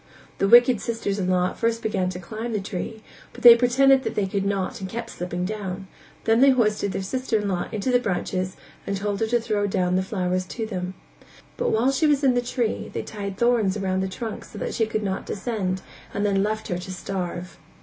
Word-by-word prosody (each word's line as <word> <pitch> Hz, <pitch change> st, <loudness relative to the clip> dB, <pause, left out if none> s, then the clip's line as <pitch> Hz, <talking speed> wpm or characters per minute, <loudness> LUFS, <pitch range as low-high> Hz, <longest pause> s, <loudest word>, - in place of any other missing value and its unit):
The 195 Hz, -, +3 dB
wicked 240 Hz, +1 st, +7 dB
sisters 225 Hz, -3 st, -2 dB
in 185 Hz, -1 st, 0 dB
law 180 Hz, 0 st, +2 dB
at -, -, -13 dB
first 230 Hz, 0 st, 0 dB
began 195 Hz, -4 st, 0 dB
to 180 Hz, -, -5 dB
climb 220 Hz, +6 st, -5 dB
the 210 Hz, -, 0 dB
tree, 210 Hz, +3 st, -5 dB, 0.3 s
but -, -, -11 dB
they 240 Hz, -1 st, +12 dB
pretended 265 Hz, +3 st, +4 dB
that -, -, -4 dB
they 205 Hz, -, +1 dB
could 195 Hz, +1 st, -2 dB
not 195 Hz, -1 st, -2 dB
and 190 Hz, -, -4 dB
kept 230 Hz, +1 st, -5 dB
slipping 180 Hz, 0 st, -3 dB
down; 195 Hz, -2 st, -4 dB, 0.4 s
then 225 Hz, +2 st, +3 dB
they 275 Hz, -, +8 dB
hoisted 215 Hz, -6 st, +2 dB
their 190 Hz, -, -3 dB
sister 255 Hz, +2 st, -1 dB
in 210 Hz, -1 st, -2 dB
law 180 Hz, -3 st, -1 dB
into 215 Hz, +4 st, -1 dB
the 245 Hz, -, +5 dB
branches 185 Hz, -3 st, -2 dB, 0.3 s
and 200 Hz, -, -1 dB
told 200 Hz, 0 st, -2 dB
her 225 Hz, -, +1 dB
to 240 Hz, +2 st, +2 dB
throw 210 Hz, -3 st, 0 dB
down 180 Hz, -2 st, +1 dB
the -, -, +2 dB
flowers 185 Hz, -1 st, -1 dB
to 225 Hz, +4 st, -4 dB
them. 185 Hz, -3 st, -4 dB, 0.6 s
But -, -, 0 dB
while 235 Hz, +5 st, +3 dB
she 305 Hz, +4 st, +2 dB
was 290 Hz, -1 st, +2 dB
in 265 Hz, -2 st, +5 dB
the 245 Hz, -, +2 dB
tree, 245 Hz, -2 st, -2 dB
they -, -, -3 dB
tied 200 Hz, -2 st, -6 dB
thorns 225 Hz, -5 st, +2 dB
round 190 Hz, -1 st, 0 dB
the 190 Hz, -, -1 dB
trunk 215 Hz, +4 st, -5 dB
so -, -, -12 dB
that -, -, -3 dB
she 225 Hz, -, +1 dB
could 215 Hz, -1 st, -2 dB
not 190 Hz, -1 st, -3 dB
descend 195 Hz, -4 st, -2 dB, 0.3 s
and 205 Hz, -, 0 dB
then 195 Hz, -1 st, +2 dB
left 215 Hz, +2 st, -2 dB
her 175 Hz, -, -1 dB
to 185 Hz, +1 st, -7 dB
starve. 180 Hz, -2 st, -5 dB
205 Hz, 230 wpm, -24 LUFS, 190-230 Hz, 0.6 s, they